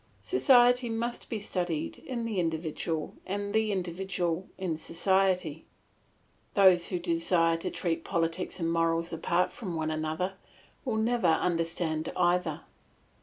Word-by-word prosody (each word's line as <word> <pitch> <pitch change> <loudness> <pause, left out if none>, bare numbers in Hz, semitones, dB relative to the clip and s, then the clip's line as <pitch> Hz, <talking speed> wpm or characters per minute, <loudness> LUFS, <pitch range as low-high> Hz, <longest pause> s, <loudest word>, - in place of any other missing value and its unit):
Society 245 -8 +5
must 235 +1 -3
be 225 - -2
studied 180 -6 -3
in 240 -3 -4
the 215 -4 -1
individual 160 -1 -2
and 200 +1 -3
the 220 -1 +2
individual 180 -1 -2
in 185 -4 -2
society; 180 -1 0 0.9
those 185 -4 +6
who 180 - -1
desire 165 -1 +2
to 165 - -3
treat 165 -2 -2
politics 170 +2 -2
and 165 -1 0
morals 165 0 +1
apart 170 +2 +1
from 185 -7 -5
one 155 -1 -1
another 155 +4 -2 0.5
will 235 -4 0
never 230 -2 +2
understand 165 -1 0
either. 175 +1 +1
175 Hz, 125 wpm, -29 LUFS, 165-200 Hz, 0.9 s, those